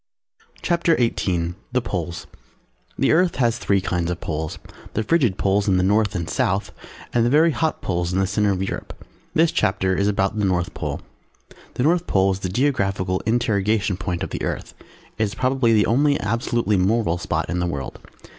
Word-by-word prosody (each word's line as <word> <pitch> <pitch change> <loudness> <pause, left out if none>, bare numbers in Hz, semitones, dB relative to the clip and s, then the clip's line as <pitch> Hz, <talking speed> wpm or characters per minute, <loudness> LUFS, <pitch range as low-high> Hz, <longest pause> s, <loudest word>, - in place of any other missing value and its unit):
CHAPTER 170 -1 +2
XVIII 90 -8 0 0.2
THE 125 - +2
POLES 85 -5 -4 0.7
The - - +2
Earth 175 +2 +3
has 120 -2 +1
three 100 -1 +1
kinds 90 -2 -1
of 90 0 -3
Poles, 80 -1 -4 0.4
the 110 - +1
Frigid 120 - +2
Poles 100 +1 +1
in 95 -2 +3
the 90 - +2
North 105 +1 +2
and 85 -3 -2
South 100 -4 0 0.4
and 120 - +3
the 120 - +2
very 155 +5 +4
hot 160 +1 -1
Poles 85 -1 -1
in 90 - -1
the 95 - +2
centre 105 +2 +1
of 95 -1 0
Europe. 95 - -5 0.4
This 165 +1 +4
chapter 95 -1 +1
is 100 +2 +1
about 100 +1 0
the - - 0
North 90 -2 0
Pole. - - -4 0.7
The 125 - 0
North 170 +4 +2
Pole 95 0 +3
is 95 - -3
the 95 - -3
Geographical 95 -6 0
interrogation 105 -3 +1
point 90 -2 -3
of - - -5
the - - -4
Earth. - - -4 0.5
It - - +3
is 105 +1 -5
probably 130 -1 +2
the 110 -2 +4
only 140 +5 +2
absolutely 115 -1 0
moral 95 -2 +1
spot - - -2
in 90 +2 -2
the 90 - 0
World. 70 -6 -5
100 Hz, 190 wpm, -22 LUFS, 95-120 Hz, 0.7 s, very